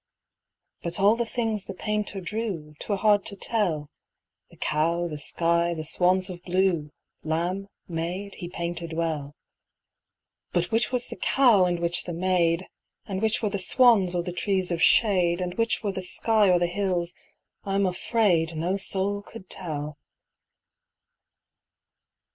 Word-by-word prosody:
But 170 +2 -2
all 205 +3 +5
the 235 0 -1
things 225 -4 -2
the 195 - -7
painter 210 0 -2
drew 185 -6 -4
'Twere 205 - -2
hard 205 0 +4
to 200 - -5
tell 180 -9 -1 0.6
The - - -19
cow, 170 +3 0
the 150 -3 -6
sky, 170 +3 +1
the 155 - -4
swans 180 +3 +2
of 180 -2 -7
blue, 180 -4 +1 0.3
Lamb, 175 +5 -1 0.2
maid, 180 +4 -4
he 175 - -7
painted 170 -1 -4
well. 155 -3 -2 1.2
But 175 0 0
which 225 +2 +1
was 250 -1 -1
the - - -6
cow 235 -9 +4
and 175 -1 0
which 170 0 -1
the 175 - -4
maid, 175 0 +1 0.4
And 195 -2 -4
which 220 +1 +1
were 210 - +1
the 200 - -2
swans 200 -3 +4
or 175 - 0
the 180 0 -5
trees 185 0 0
of 170 -1 -1
shade, 180 -6 +4
And 180 -1 -2
which 230 +4 0
were 205 - 0
the 190 - -4
sky 210 +3 +2
or 180 - +5
the 175 - +2
hills, 180 -1 -1 0.5
I'm 195 0 +1
afraid, 180 -4 +1
No 175 +5 0
soul 200 +1 0
could 205 -2 -12
tell. 150 -4 -5
185 Hz, 155 wpm, -26 LUFS, 170-205 Hz, 1.2 s, all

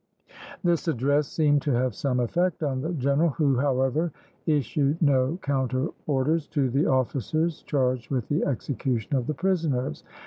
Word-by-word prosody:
This 175 -1 +1
address 145 0 +1
seemed 145 -3 +2
to 145 - 0
have 125 0 +1
some 125 +3 -1
effect 170 +8 0
on 135 -3 -1
the 160 - -3
general, 140 +3 +2
who, 140 -3 +1
however, 140 +4 +1 0.4
issued 145 +1 +1
no 140 0 +2
counter 130 0 0 0.2
orders 150 +2 +1
to 140 -5 0
the 140 +5 +2
officers 145 - 0
charged 130 -3 -1
with 125 -5 -1
the 150 +3 0
execution 130 -2 -2
of 125 -3 -1
the 155 - -1
prisoners. 155 - -1
140 Hz, 150 wpm, -26 LUFS, 130-155 Hz, 0.4 s, seemed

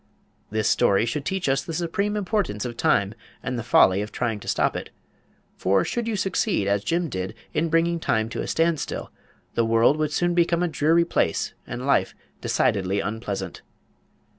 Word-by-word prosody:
This 110 0 0
story 100 +3 +3
should 140 +4 -3
teach 190 -3 -1
us 135 0 +2
the 165 - -5
supreme 200 +5 -1
importance 190 - -1
of 120 -1 -4
Time 100 -2 +2 0.3
and 125 - -2
the 120 - -2
folly 100 -4 +5
of 105 - -5
trying 115 -4 -2
to - - -12
stop - - +1
it. - - -5 0.7
For 95 0 +2
should 240 -1 -2
you 225 - -1
succeed, 190 - 0
as 100 0 +1
Jim 170 +7 0
did, 95 -4 -4 0.2
in 165 +2 0
bringing 165 +1 +2
Time 110 -8 0
to - - -4
a - - -4
standstill, 165 -1 -1 0.4
the 115 - +2
world 115 +5 +4
would 155 -1 0
soon 175 +3 +1
become 170 0 +2
a - - +2
dreary 165 +1 +3
place - - 0
and - - -5
life - - +2 0.3
decidedly 95 0 +1
unpleasant. 100 -4 -4
145 Hz, 180 wpm, -24 LUFS, 105-170 Hz, 0.7 s, folly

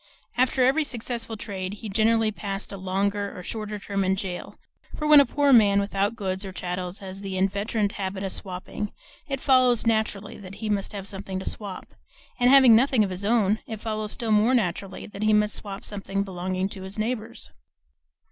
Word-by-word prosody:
After 255 0 +3
every 280 +5 +3
successful 235 -4 -4
trade 195 -2 -5
he 220 +1 -8
generally 220 +2 +2
passed 200 -1 -5
a - - -5
longer 200 +2 -1
or 180 - -7
shorter 215 +1 -4
term 200 -1 -2
in 190 0 +2
jail; 185 -2 -5 0.4
for 300 - -3
when 300 -1 +9
a 280 - +5
poor 285 +1 +3
man 205 -4 +6
without 200 +2 0
goods 190 -3 -3
or 195 - -6
chattels 180 0 -4
has 190 +1 -7
the 195 -1 -4
inveterate 200 +2 0
habit 190 -1 -4
of 195 - -2
swapping, 190 +2 -4 0.4
it 275 -2 -2
follows 255 -4 +4
naturally 220 -2 0
that 195 -1 -9
he 220 -2 -3
must 200 +1 -1
have 200 -1 -5
something 195 -1 -5
to 190 - -6
swap; 200 -3 -6 0.5
and 245 0 +5
having 260 -4 +8
nothing 250 -1 +4
of 195 - -2
his 185 +2 -5
own, 215 -1 +2
it 220 -2 -5
follows 215 -1 -3
still 230 -3 -2
more 215 +4 +4
naturally 195 -3 -2
that 205 -1 -9
he 215 0 +3
must 210 0 +3
swap 200 -1 -5
something 200 -1 -2
belonging 185 0 -2
to 195 - -8
his 190 +2 -7
neighbors. 225 +1 -3
205 Hz, 195 wpm, -25 LUFS, 195-225 Hz, 0.5 s, when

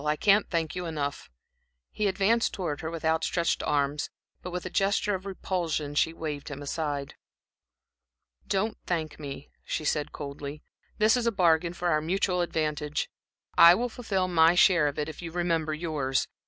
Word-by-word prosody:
I 150 0 +1
can't 200 +5 +3
thank 165 -3 -1
you 180 -1 -3
enough." 145 -3 -4 0.6
He 210 - 0
advanced 200 +4 +2
towards 165 -7 -3
her 160 - -3
with 165 -1 -6
outstretched 160 +1 +1
arms, 145 0 0 0.3
but 180 - -6
with 180 0 -5
a - - -3
gesture 200 +2 +1
of 190 +1 -4
repulsion 170 -6 -2
she 155 +2 +2
waved 155 -3 -5
him 145 0 -7
aside. 145 -1 -3 1.3
"Don't 205 +3 -1
thank 160 -4 -2
me," 140 -1 -8
she 155 - -3
said, 150 -1 0
coldly. 145 0 -7 0.3
"This 215 +2 +5
is 240 -2 0
a - - +3
bargain 170 -3 +3
for 175 0 -1
our 155 -2 +2
mutual 180 +2 0
advantage. 150 -3 -2 0.5
I 170 +1 +10
will 245 +4 -1
fulfil 200 -6 -1
my 165 -1 +5
share 175 -4 +5
of 145 - -3
it 150 - -1
if 160 - -8
you 170 -1 -6
remember 165 -2 0
yours. 150 -5 -1
165 Hz, 170 wpm, -28 LUFS, 150-185 Hz, 1.3 s, I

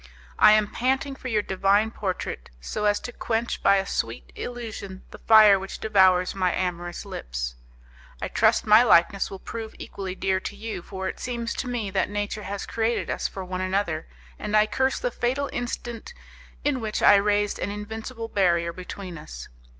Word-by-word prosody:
I 210 - +8
am 215 -1 +4
panting 265 +3 0
for 265 - -8
your 215 -4 +1
divine 200 +3 +2
portrait, 185 - -4
so 60 - -3
as 205 0 +3
to 245 - -6
quench 230 0 -2
by 200 - +5
a 195 0 +1
sweet 115 -10 -3
illusion 220 -6 -6
the - - -11
fire 215 -3 +7
which 195 +1 -7
devours 190 -4 +4
my 185 -2 +1
amorous 175 -1 -3
lips. - - -5 0.7
I - - -3
trust - - +3
my 215 +2 +8
likeness 195 -4 +4
will 195 - -7
prove 220 +3 -7
equally 190 -2 -6
dear 190 0 0
to - - -6
you, 220 -4 -5
for 190 +1 -5
it - - -5
seems 235 -2 -3
to 260 - -4
me 230 -5 -2
that 190 - 0
nature 205 +1 -3
has 200 0 -5
created 230 +1 -1
us - - -1
for 190 -1 -7
one 185 0 -4
another, 185 -4 -1 0.3
and 210 0 +1
I 215 - +6
curse 265 +5 0
the - - -2
fatal 265 +4 -1
instant 240 - -5 0.5
in 280 -4 0
which 215 -1 -2
I 205 - +8
raised 205 0 +1
an 185 - -2
invincible 220 +3 -6
barrier 170 -5 +1
between 185 -1 -8
us. - - -9
205 Hz, 180 wpm, -25 LUFS, 185-225 Hz, 0.7 s, I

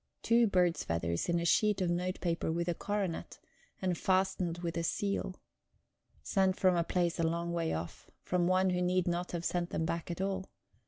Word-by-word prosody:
Two 230 0 +4
bird's 180 -3 +2
feathers 85 - -1
in 170 0 +2
a 170 - -2
sheet 210 +3 +3
of 180 -2 +1
note 180 +2 -1
paper 170 -2 0
with 170 +1 -1
a 175 - +1
coronet, 200 -1 -3 0.4
and 185 -2 0
fastened 185 -2 +1
with 170 -1 -4
a 170 - 0
seal. 195 +2 -1 0.9
Sent 190 -2 +2
from 185 -1 +4
a 170 - +2
place 175 0 0
a - - +2
long 170 +1 -1
way 165 -1 0
off; 80 +1 -5
from 180 -1 +1
one 185 0 +3
who 180 0 0
need 180 0 +1
not 175 +1 -1
have 170 -1 -3
sent 175 -1 0
them 160 - -1
back 170 +1 -3
at 170 - -4
all. 190 0 -2
175 Hz, 200 wpm, -32 LUFS, 170-185 Hz, 0.9 s, Two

